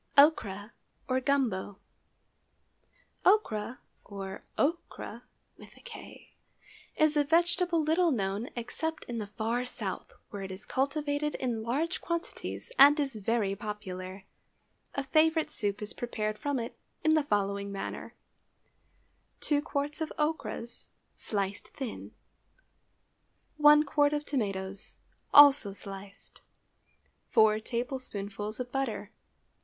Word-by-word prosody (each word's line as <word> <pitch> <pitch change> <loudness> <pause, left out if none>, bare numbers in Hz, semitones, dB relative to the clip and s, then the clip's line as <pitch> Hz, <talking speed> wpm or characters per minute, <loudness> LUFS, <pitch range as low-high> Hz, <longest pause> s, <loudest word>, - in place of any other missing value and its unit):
OCHRA, 220 -9 +4 0.4
OR 255 0 +2
GUMBO. 240 -9 0 1.5
Ochra, 250 - +2 0.3
or 195 -1 -7 0.2
okra, 335 +4 -2 1.8
is 310 -1 +4
a 295 - +4
vegetable 345 +2 +2
little 330 +3 +3
known 205 -3 -1
except 320 +7 -3
in 235 -1 -5
the 210 - -4
far 225 +4 -1
South, 250 - -5 0.2
where 205 - -5
it 195 - -5
is 190 +2 -9
cultivated 290 +2 -1
in 240 -4 -2
large 290 - -1
quantities 340 +7 -4
and 290 +2 +9
is 275 -2 0
very 215 -1 0
popular. 190 -3 -6 0.7
A 275 - -1
favorite 315 +2 +3
soup 205 -5 -1
is 210 - -3
prepared 215 -3 -3
from 285 -1 -1
it 235 -1 -4 0.3
in 315 - +4
the 310 - +4
following 200 -4 -1
manner:— 195 - -6 1.3
2 290 -1 +2
qts. 295 +1 -3
of 315 - -2
ochras, 300 -6 -3 0.3
sliced 200 0 -3
thin. 265 -5 -6 1.5
1 300 0 +7
qt. 290 +1 +3
of 295 0 -1
tomatoes, 195 -7 -1 0.3
also 285 -8 +8
sliced. 195 0 -9 0.9
4 220 -2 +5
tablespoonfuls 215 -4 -4
of 250 0 -4
butter. 270 0 -2
245 Hz, 110 wpm, -30 LUFS, 205-295 Hz, 1.8 s, and